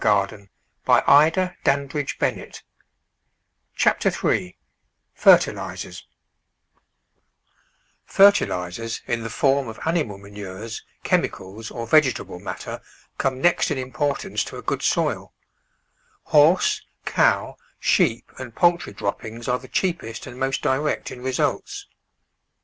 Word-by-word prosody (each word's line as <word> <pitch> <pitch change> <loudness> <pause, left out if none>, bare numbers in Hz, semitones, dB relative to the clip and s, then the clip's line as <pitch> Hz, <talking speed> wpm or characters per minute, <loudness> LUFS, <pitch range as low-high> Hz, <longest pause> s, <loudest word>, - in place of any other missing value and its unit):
Digitized 100 -1 +1 0.3
by 145 +3 +6
Google 145 -5 -1 1.3
Chapter - - +3
THREE 90 - -1 0.6
ftxt&im* - - +3 2.1
FERTILISERS 115 - +2
in 120 -1 -2
the 115 - -5
form 135 +3 +1
of 110 -1 -8
animal 160 - 0
ma 100 - -15
nures, 105 +2 -7 0.2
chemicals 100 +4 -2
or 115 -1 -6
vegetable 130 - +2
matter 100 - -6 0.4
come 130 -1 0
next 175 +5 +3
in 145 - -1
importance 135 +2 -2
to - - -8
a - - -9
good - - -2
soil. - - 0 0.9
Horse, 155 +5 +4 0.2
cow, - - +2 0.2
sheep, 115 - +1
and 125 -3 -8
poultry 175 -1 +2
droppings 115 +3 -5
are 125 0 +1
the 130 - -13
cheapest 165 -12 -2
and 125 -1 -10
most 135 0 -1
direct 145 +3 0
in 125 - -9
results. 130 0 -2
130 Hz, 105 wpm, -23 LUFS, 110-145 Hz, 2.1 s, by